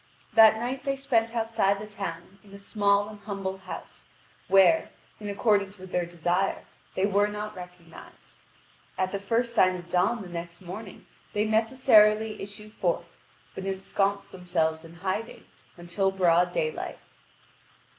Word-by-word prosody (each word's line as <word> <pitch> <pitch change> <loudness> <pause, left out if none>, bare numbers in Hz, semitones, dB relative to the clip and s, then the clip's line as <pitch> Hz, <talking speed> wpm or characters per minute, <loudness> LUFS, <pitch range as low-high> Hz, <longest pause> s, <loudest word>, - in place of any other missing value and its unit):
That 220 -1 +7
night 250 +3 -3
they 275 -1 0
spent 235 -4 0
outside 225 -3 +1
the 210 - -7
town 195 -2 -7
in 200 - -18
a - - -9
small 200 0 +1
and 210 -1 -10
humble 195 -2 -5
house, 190 -1 -9 0.4
where, 195 +12 +5 0.3
in 210 -1 -6
accordance 200 -1 +1
with 185 0 -11
their 175 -1 0
desire, 175 +3 -1 0.3
they 190 - +2
were 205 +1 +3
not 210 0 -5
recognised. 180 -2 -13 0.6
At 185 0 0
the 200 - -2
first 230 +4 0
sign 185 -5 +4
of 175 -1 -9
dawn 195 +6 +1
the - - -9
next 170 0 -7
morning 190 +2 -9 0.3
they 210 0 +1
necessarily 220 -1 +4
issue 205 +2 -8
forth, - - -1 0.5
but 190 - -6
ensconce 195 +1 -1
themselves 165 -3 -1
in 165 0 -13
hiding 190 +6 -4 0.3
until 175 +3 0
broad 180 -2 +3
daylight. 470 -2 -2
200 Hz, 145 wpm, -27 LUFS, 185-215 Hz, 0.6 s, That